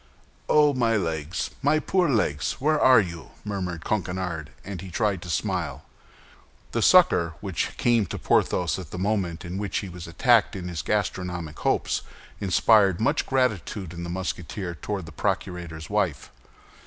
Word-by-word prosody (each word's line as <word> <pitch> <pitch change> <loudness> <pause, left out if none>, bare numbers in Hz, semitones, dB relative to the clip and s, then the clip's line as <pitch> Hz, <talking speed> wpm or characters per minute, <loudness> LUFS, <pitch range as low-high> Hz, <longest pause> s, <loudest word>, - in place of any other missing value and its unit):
"Oh, 150 -1 +5
my 115 -4 +2
legs, 80 -2 -2
my 145 +2 +3
poor 175 +2 +1
legs! 75 - +1
where 150 +2 +1
are 130 -2 +7
you?" 85 -5 -4 0.2
murmured 90 -5 -4
Coquenard, 90 -5 -2 0.2
and 95 -3 -6
he 95 - -8
tried 100 -1 0
to 90 - -8
smile. 80 - -2 0.9
This - - +3
succor, 85 -2 +5
which 95 -4 -3
came 120 -4 +2
to - - -5
Porthos 90 0 +1
at 90 -5 -8
the - - -7
moment 95 -3 -1
in 90 +2 -4
which 100 -2 -2
he 95 - -3
was 90 -1 -8
attacked 110 +5 +3
in 90 -2 -5
his 85 -2 -3
gastronomic 90 -6 -2
hopes, - - 0 0.4
inspired 95 0 +4
much 140 +7 +1
gratitude 110 -8 -1
in 85 - -7
the 85 - -5
Musketeer 90 0 -4
toward 95 +2 -4
the 80 - -10
procurator's 80 -1 -3
wife. - - -1
95 Hz, 155 wpm, -25 LUFS, 85-110 Hz, 0.9 s, are